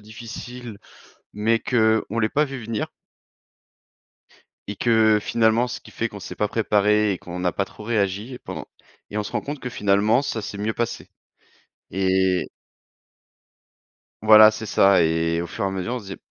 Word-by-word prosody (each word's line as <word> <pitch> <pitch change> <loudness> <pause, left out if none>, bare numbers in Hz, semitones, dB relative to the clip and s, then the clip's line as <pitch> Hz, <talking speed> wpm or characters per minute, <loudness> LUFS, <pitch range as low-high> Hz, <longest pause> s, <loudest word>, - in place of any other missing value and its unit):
difficile, 115 +1 -9 0.6
mais 110 +2 +1
qu'on 125 - -2 0.3
ne 115 - -2
l'ait 110 -1 +1
pas 150 +6 +2
vue 135 -4 -7
venir 110 -1 -3 1.8
et 100 - -5
que 110 -2 +4
finalement, 115 +3 +2
ce - - -6
qui - - -15
fait 115 - -2
qu'on 105 -2 -10
s'est - - -8
pas 105 - 0
préparé 105 -1 +2
et 95 - -4
qu'on 90 0 -8
n'a 90 -1 0
pas 100 - -1
trop 105 - -13
réagi 105 +2 -1
pendant - - -7 0.4
et 105 - -3
on - - 0
se 100 - -8
rend - - 0
compte 145 0 -6
que 125 - -4
finalement 105 +4 +2
ça 115 -5 -3
s'est 100 - -6
mieux 105 +2 -1
passé 120 -1 -4 0.8
et 95 -1 +1 1.8
Voilà 110 0 +9
c'est 110 +1 -7
ça 95 -3 +4
et 80 +1 +1
au - - -5
fur 100 +4 -4
et - - +1
à - - -1
mesure 95 +5 -3
on - - -2
se 110 - -12
disait: 95 0 -7
105 Hz, 180 wpm, -23 LUFS, 100-115 Hz, 1.8 s, Voilà